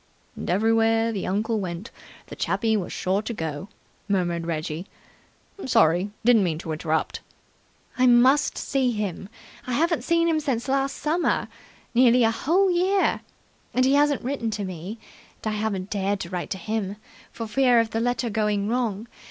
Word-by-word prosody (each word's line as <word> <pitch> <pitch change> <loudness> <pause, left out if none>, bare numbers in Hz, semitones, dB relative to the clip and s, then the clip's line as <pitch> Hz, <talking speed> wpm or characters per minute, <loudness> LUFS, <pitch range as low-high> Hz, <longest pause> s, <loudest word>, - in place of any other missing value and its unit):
"And - - -6
everywhere 225 +3 +2
the 200 -4 -3
uncle 215 +4 0
went, 185 +4 -5 0.3
the - - -10
chappie 225 -2 0
was 195 -4 -2
sure 190 +2 0
to 235 - -5
go!" 160 +1 -5 0.4
murmured 175 -4 0
Reggie. 160 +2 -3 0.8
"Sorry. 190 -5 +3 0.2
Didn't 235 -4 +6
mean 165 -4 -1
to 160 0 -6
interrupt." 160 0 -1 0.8
"I 255 - +5
must 255 +4 +4
see 265 -3 0
him. 200 -2 -4 0.4
I 250 - -2
haven't 330 +6 +1
seen 335 0 +2
him 320 -2 +2
since 270 -5 -2
last 275 +1 0
summer 330 +3 0 0.5
nearly 245 0 +5
a 225 - +4
whole 360 - +2
year! 375 +3 +2 0.5
And 255 +1 +4
he 265 - +3
hasn't 285 -1 +3
written 250 -3 -2
to 210 -1 -3
me, 185 +4 -6 0.5
and 215 - -1
I - - -3
haven't 205 -3 -3
dared 200 0 -1
to 170 - -6
write 180 -1 -4
to - - -3
him, 205 0 -3 0.4
for 230 - -6
fear 245 +2 +3
of 225 -1 0
the 225 - -1
letter 240 0 -1
going 210 -1 0
wrong. 230 -3 -1
225 Hz, 170 wpm, -24 LUFS, 190-255 Hz, 0.8 s, Didn't